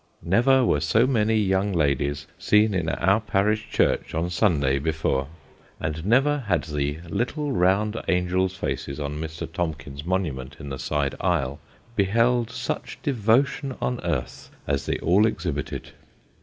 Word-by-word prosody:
Never 125 +8 +4
were 75 - +2
so 95 +10 +3
many 110 -4 +2
young 100 -1 +1
ladies 70 -2 0
seen 105 0 +3
in 85 -4 0
our 100 +6 +2
parish 105 +1 0
church - - +1
on 85 +2 -1
Sunday 75 -8 +2
before; 75 -3 0 0.5
and 75 +1 -3
never 135 +8 +3
had 90 -4 +2
the 75 -1 -2
little 140 - -2
round 105 +1 +2
angels' 90 +1 +1
faces 70 -6 -3
on 75 +1 -4
Mr. 80 +1 -5
Tomkins's 75 -6 -4
monument 75 -7 -2
in 70 - -7
the 65 -1 -5
side 70 0 -1
aisle, 70 -7 0 0.4
beheld 115 +4 +2
such 115 - -4
devotion 135 +2 +1
on 125 -1 -1
earth 80 -8 -3 0.2
as 70 -2 -1
they - - 0
all 100 +6 +4
exhibited. 80 -9 -4
90 Hz, 140 wpm, -25 LUFS, 75-110 Hz, 0.5 s, Never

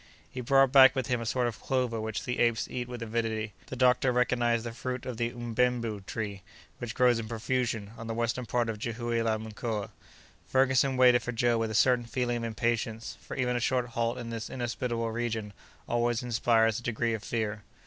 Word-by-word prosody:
He 125 - -5
brought 135 +1 +4
back 130 0 +8
with 130 - 0
him 125 -3 -1
a 115 - -4
sort 125 +3 +1
of 120 -2 -3
clover 125 -4 0
which 110 -2 -3
the 125 -1 -3
apes 115 -2 +2
eat 125 -1 -4
with 120 -1 -6
avidity. 110 -1 -2
The - - -6
doctor 125 0 +3
recognized 120 -2 +2
the 120 - -4
fruit 125 +1 -5
of 125 -3 -5
the 115 0 0
"mbenbu"—tree 115 -4 -2 0.4
which 120 -2 -5
grows 125 -2 +4
in 110 - -5
profusion, 115 -2 -2
on 115 - -6
the 115 - -3
western 120 +1 -1
part 120 0 +1
of 110 -2 -4
Jihoue 115 0 -2
la 110 -1 +1
Mkoa. 110 -1 -4 0.6
Ferguson 130 0 +3
waited 125 -1 +6
for 125 +3 -4
Joe 120 0 +2
with 115 -1 0
a 110 - -4
certain 125 +2 +4
feeling 120 +1 -1
of 115 - -4
impatience, 115 0 -2
for - - -8
even 125 -2 +1
a - - +1
short 125 0 0
halt 115 +1 -1
in 120 -2 -6
this 115 -1 -5
inhospitable 120 -2 -2
region 110 -3 -3 0.3
always 120 0 0
inspires 115 -2 +2
a - - -11
degree 120 -1 -1
of 110 - -3
fear. 110 -2 -2
120 Hz, 200 wpm, -29 LUFS, 115-125 Hz, 0.6 s, back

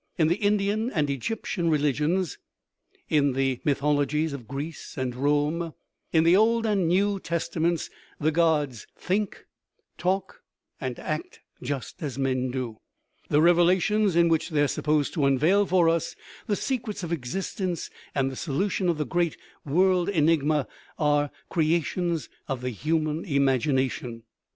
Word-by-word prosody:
In 160 -2 +3
the 175 - +2
Indian 205 +2 +1
and 150 - 0
Egyptian 170 - -2
re 155 - +3
ligions, 150 +5 0 0.7
in 145 -3 +2
the 135 -1 0
mythologies 145 +2 +1
of 125 -5 -8
Greece 145 +5 -6
and 130 -2 -2
Rome, 150 +5 0 0.4
in 160 -1 +4
the 170 +2 +5
Old 225 +3 +3
and 210 -3 +2
the - - +1
New 195 +4 +2
Testaments, 170 -1 -1 0.3
the 155 +1 +2
gods 150 -7 +1
think, 200 +2 -2 0.5
talk, 190 +1 -1 0.4
and 130 -4 -4
act 155 0 -5 0.2
just 130 -4 -5
as 140 -5 -4
men 130 -1 0
do; 125 -4 -4 0.5
the 150 +1 +4
revelations, 180 +3 +4
in 170 0 +5
which 165 0 +1
they 150 -3 +2
are - - +3
supposed 150 0 0
to 150 -5 +1
unveil 170 +10 +3
for 175 -2 +4
us 165 -1 0 0.3
the 210 - +1
secrets 230 -5 -3
of 170 - -4
existence 170 +4 -3 0.2
and 135 -1 +1
the - - -7
solution 180 +6 -1
of 170 - +1
the 150 - -1
great 175 -1 0 0.3
world 180 +4 +2
enigma, 155 -4 +2 0.3
are 145 -1 +2 0.2
crea 165 0 +2
tions 170 -3 -2 0.2
of 135 -2 -3
the 125 0 -2
human 155 - -1
imagination. 130 - 0
155 Hz, 150 wpm, -26 LUFS, 140-180 Hz, 0.7 s, the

